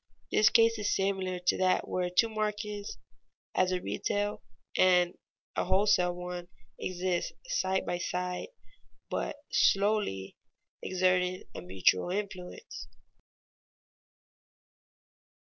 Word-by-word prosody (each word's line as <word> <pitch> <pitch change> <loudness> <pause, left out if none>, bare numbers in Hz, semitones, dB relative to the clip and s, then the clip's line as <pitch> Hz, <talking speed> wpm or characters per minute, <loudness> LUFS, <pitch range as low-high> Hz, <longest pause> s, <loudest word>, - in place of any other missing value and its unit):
This 215 +1 +6
case 230 -1 +4
is 205 - +1
similar 190 -2 0
to 180 0 +1
that 185 -1 +2
where 180 -1 -1
two 180 +6 +4
markets, 210 -1 -3 0.6
as 185 0 +2
a 185 - +1
retail 205 +3 -2 0.3
and 180 -1 +4 0.4
a - - 0
wholesale 185 -1 +3
one, 180 0 -6 0.3
exist 180 -1 -1
side 190 - 0
by 175 - -2
side, 180 - -2 0.6
but - - -2 0.2
slowly 195 - +2 0.4
exerting 185 0 +1
a - - -6
mutual 90 - +2
influence. 195 - -5
185 Hz, 100 wpm, -30 LUFS, 180-205 Hz, 0.6 s, This